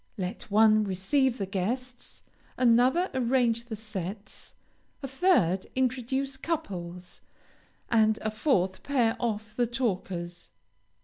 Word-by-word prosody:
Let 190 +4 -5
one 215 +1 +5
receive 230 +7 +1
the 195 - -2
guests, 240 +7 -4 0.3
another 255 +9 +3
arrange 240 -2 +1
the 235 -2 -5
sets, 205 -2 -7 0.5
a - - -2
third 260 - +2
introduce 260 +1 -1
couples, 180 - -5 0.7
and 220 -2 +3
a 215 - -1
fourth 210 - 0
pair 245 -5 +1
off 220 -2 -3
the 240 0 +1
talkers. 185 -8 -3
225 Hz, 110 wpm, -28 LUFS, 195-255 Hz, 0.7 s, one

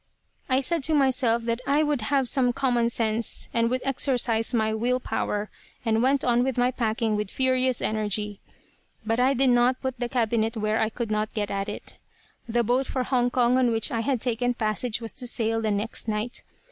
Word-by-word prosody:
"I 260 +1 +3
said 330 +4 +1
to 315 - +2
myself 255 -4 +2
that 230 +1 -2
I 290 +2 +3
would 295 -5 0
have 270 +3 +1
some 250 -1 +2
common 240 -2 +1
sense, 225 -1 -1
and 230 0 +2
would 255 +1 -1
exercise 245 -4 +2
my 220 -3 +1
will 245 +3 0
power; 210 -4 -3 0.3
and 225 0 +2
went 270 +2 +2
on 245 0 +2
with 265 -1 -2
my 245 +1 +3
packing 225 -2 -1
with 210 -1 -2
furious 255 0 +1
energy. 210 -1 -2 0.7
But 225 +2 0
I 260 +2 +3
did 260 0 +3
not 245 +1 +3
put 260 -2 -3
the 245 -1 -2
cabinet 230 -2 0
where 215 +1 0
I 220 - +1
could 230 -1 -4
not 215 0 -1
get 205 -2 -2
at 195 +1 -2
it. 210 - -8 0.5
"The 235 +1 +1
boat 250 +4 +1
for 255 - -1
Hong 250 -1 +1
Kong 245 0 +2
on 250 -2 +3
which 225 -1 0
I 230 - -1
had 255 +2 0
taken 245 +1 0
passage 220 +1 -1
was 225 - -6
to 250 - -5
sail 225 -1 0
the 220 - 0
next 210 +3 -3
night. 215 +2 -3
240 Hz, 205 wpm, -25 LUFS, 220-255 Hz, 0.7 s, I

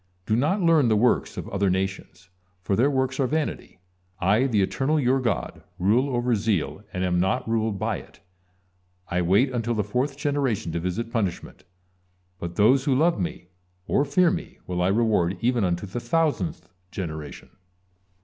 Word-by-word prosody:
Do 110 - +1
not 155 - +1
learn 160 -6 +4
the 110 - +3
works 120 +4 +1
of - - -5
other 100 -1 +1
nations, 95 -1 -3 0.3
for 100 - 0
their 125 +8 +3
works 130 -1 -1
are 135 - +2
vanity. 155 -8 -3 0.4
I, 105 +8 +3
the 105 -6 +2
Eternal, 140 +10 0
you 130 0 +2
God, 120 -5 -2 0.2
rule 110 +9 +2
over 120 0 +1
zeal 105 -6 -1
and 90 - -3
am 90 -1 +1
not 95 +4 0
ruled 110 -2 0
by - - -1
it; - - -14 0.9
I 90 - 0
wait 100 +10 +3
until 120 -1 -1
the 105 - 0
fourth 130 +7 -2
generation 140 - -1
to 85 - -2
visit 90 +7 -3
punishment. 100 -7 -3 0.7
But 85 -1 -6
those 130 +6 +4
who 135 - +2
love 165 +2 +2
Me, 90 0 -4 0.4
or 140 - +2
fear 165 +5 +3
Me, - - -5
will 90 -1 -2
I 90 - +2
reward 100 -4 +2
even 120 0 +1
unto 90 +1 -1
the 95 +5 -5
thousandth 120 - -1 0.2
generation." 80 -7 -6
110 Hz, 170 wpm, -25 LUFS, 95-130 Hz, 0.9 s, learn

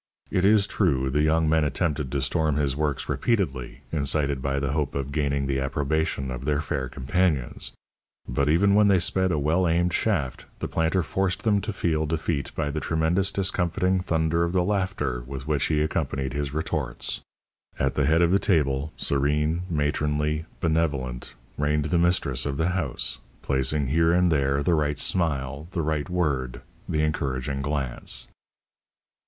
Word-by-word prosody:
It 90 - +1
is 105 0 +5
true, 70 -11 +1
the 75 +2 +2
young 80 +1 +3
men 80 0 +3
attempted 75 -2 -1
to 70 -2 -1
storm 75 +1 +1
his 70 -3 +1
works 75 -2 -1
repeatedly, 90 - -1
incited 70 -2 +1
by 70 +1 -1
the 70 -1 -1
hope 75 -2 -1
of 70 0 -3
gaining 70 -2 0
the 70 0 0
approbation 70 0 -1
of 60 0 -5
their 75 -1 +1
fair 70 -3 -2
companions; 70 0 0 0.5
but 70 +4 0
even 100 +6 +4
when 105 0 +5
they 100 -2 +5
sped 95 +1 +1
a 80 - +1
well 80 +5 +2
aimed 85 +1 +1
shaft, 80 - -1
the - - -3
planter 80 +3 +1
forced 95 +2 -1
them 105 -3 +3
to 105 - -3
feel 80 -5 0
defeat 75 -3 -2
by 75 -2 -1
the 75 - -2
tremendous 80 +5 +1
discomfiting 95 -1 +1
thunder 85 -2 +1
of 85 +1 -1
the 90 -1 +3
laughter 95 -10 -1
with 65 +1 -6
which 75 -3 +1
he 75 -1 +1
accompanied 70 -4 -2
his 70 -1 -2
retorts. 80 +2 -2 0.6
At 70 0 0
the 70 -2 +1
head 80 +2 +4
of 85 - +3
the 100 - +4
table, 75 -6 +1
serene, 75 +4 +1
matronly, 75 0 0 0.2
benevolent, 70 -8 -1 0.2
reigned 75 0 +1
the 85 +2 +1
mistress 75 -7 +1
of 70 -1 -2
the 80 +3 +1
house, 90 -8 -1 0.2
placing 70 +2 +1
here 80 +3 +3
and 90 0 +3
there 70 -1 +1
the 85 - +2
right 75 -2 +1
smile, 70 -4 -1
the 85 - -1
right 75 -2 -1
word, 70 -9 -1 0.3
the 75 0 +1
encouraging 70 -3 -1
glance. 70 -3 -1
75 Hz, 170 wpm, -25 LUFS, 70-85 Hz, 0.6 s, is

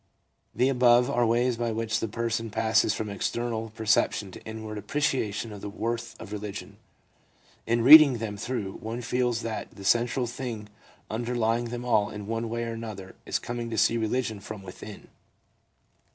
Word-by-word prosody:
The 125 - +3
above 125 -1 +4
are 120 -2 +2
ways 120 +1 +2
by 120 -1 -1
which 110 0 -1
the 115 - -2
person 115 +1 -2
passes 110 -1 +2
from 110 - -3
external 115 +2 -2
perception 105 -2 +1
to - - -11
inward 110 -1 -6
appreciation 110 -3 -1
of 100 - -9
the 105 - -5
worth 115 +3 -4
of 110 - -9
religion. 105 -1 -6 0.9
In 115 +1 +2
reading 145 -1 +10
them 110 -2 -4
through, 105 -3 -4
one 115 +2 -4
feels 120 0 0
that 110 -3 -4
the 100 0 -12
central 120 +4 +2
thing 120 -3 -6 0.4
underlying 120 0 0
them 120 +1 -5
all 110 -4 +2
in 105 -1 -7
one 115 +1 -3
way 115 +1 -2
or 115 0 -3
another 105 -5 -7
is - - +1
coming 120 -1 -5
to 110 - -4
see 115 +2 +4
religion 110 -1 -1
from 100 0 -8
within. 100 +2 -10
115 Hz, 165 wpm, -27 LUFS, 105-120 Hz, 0.9 s, reading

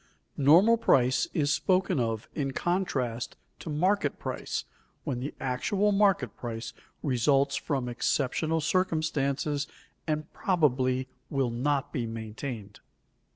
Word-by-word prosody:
_Normal 185 +12 +6
price 130 0 +3
is 150 -1 +1
spoken 185 -4 +2
of 115 -2 -1
in 135 -3 -2
contrast 135 -11 -1 0.2
to - - -7
market 185 +7 +1
price - - -4 0.4
when 135 -6 -2
the 135 +4 -5
actual 195 - +1
market 195 - +2
price 115 -1 -5 0.3
results 135 +1 +2
from 135 -2 -2
exceptional 145 +6 0
circumstances 150 -4 0 0.4
and 155 0 -2
probably 130 -7 +1 0.2
will 135 -4 0
not 135 +3 -1
be 120 -3 -1
maintained. 110 -1 -6
140 Hz, 110 wpm, -28 LUFS, 125-160 Hz, 0.4 s, Normal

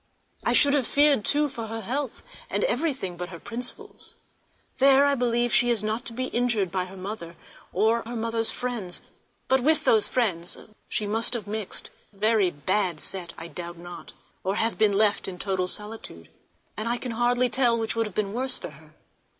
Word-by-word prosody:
I - - +2
should 285 -1 +5
have 275 -5 +2
feared, 285 -5 +4
too, 295 +7 +3
for 230 -5 -6
her 225 +1 -5
health, 260 +4 -3 0.3
and - - +1
for - - +3
everything 260 - -1
but 180 +1 -5
her 170 - -8
principles—there 265 - -1
I 285 - +3
believe 240 -2 +1
she 245 - +5
is 230 -3 +2
not 220 +3 -2
to 230 - -5
be 255 +2 -2
injured 235 -6 +1
by 185 -1 -1
her 190 +1 -11
mother, 185 -3 -6 0.4
or 220 +4 +2
her 235 +2 -7
mother's 230 0 +2
friends; 235 -8 -3 0.4
but 265 0 +3
with 310 +5 +3
those 220 -2 +4
friends 185 -9 0 0.3
she 210 - -1
must 225 +4 +1
have 220 -4 -4
mixed 210 -1 -2 0.2
(a - - -22
very 215 -2 +3
bad 175 +2 -1
set, 175 -1 -3
I 165 - -7
doubt 175 0 -7
not), 175 +1 -10 0.3
or 190 +1 0
have 225 +1 +1
been 215 -2 +5
left 210 +1 +3
in 185 -2 -5
total 185 -1 -1
solitude, 210 - -4 0.5
and 215 +2 -3
I 240 - +1
can 250 0 -4
hardly 245 +2 +2
tell 245 -3 +3
which 225 0 -1
would 225 -1 +1
have 205 - -11
been 205 -1 -1
worse 255 +2 0
for - - -7
her. 155 +1 -18
220 Hz, 195 wpm, -26 LUFS, 190-245 Hz, 0.5 s, should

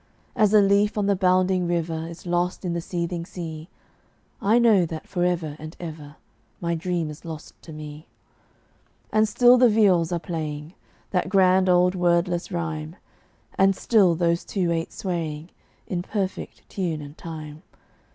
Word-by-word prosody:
As 215 -3 +3
a 215 -1 +6
leaf 205 +2 +3
on 205 - +1
the 200 0 +2
bounding 185 -1 +2
river 165 -1 -2
Is 170 +1 -10
lost 175 +2 -1
in 175 - -1
the 170 - -2
seething 170 0 -3
sea, 165 -1 -7 0.7
I 215 +4 +4
know 225 -6 +5
that 160 -1 -6
forever 175 -4 -1
and 155 +2 -9
ever 155 -4 -8 0.4
My 170 -1 -1
dream 170 -1 -2
is 150 - -12
lost 160 -2 -9
to 160 - -12
me. 150 0 -9 1.1
And 215 0 +4
still 245 +3 +6
the 250 -1 +6
viols 190 -6 +3
are 175 - +1
playing 155 -1 -5 0.4
That 185 -1 0
grand 185 -1 +4
old 180 0 +4
wordless 175 0 +1
rhyme; 160 -2 -4 0.6
And 195 0 +5
still 195 -7 +3
those 170 0 +1
two 180 -4 -1
ate 165 0 -2
swaying 165 -3 -4 0.3
In 175 -2 -3
perfect 195 0 -4
tune 165 -6 -3
and 145 +1 -11
time. 155 -2 -8
175 Hz, 155 wpm, -24 LUFS, 160-190 Hz, 1.1 s, a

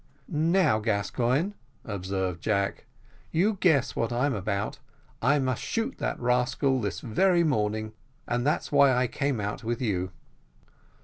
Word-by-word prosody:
"Now, 160 - +2
Gascoigne," 120 - 0 0.3
observed 95 -4 -3
Jack, 100 +1 -1 0.4
"you 195 +5 +1
guess 155 -8 +3
what 115 - -1
I'm 130 +4 +1
about 100 0 -2 0.4
I 140 +5 +4
must 130 -4 -1
shoot 225 0 -2
that - - -2
rascal 125 +2 +1
this 100 -3 -3
very 175 - +3
morning, 110 -6 0 0.3
and 120 0 0
that's 150 +3 0
why 140 -2 +6
I 125 +1 +2
came 135 0 -1
out 105 +2 -4
with 115 +1 -2
you." 95 -7 -1
125 Hz, 135 wpm, -27 LUFS, 105-145 Hz, 0.4 s, why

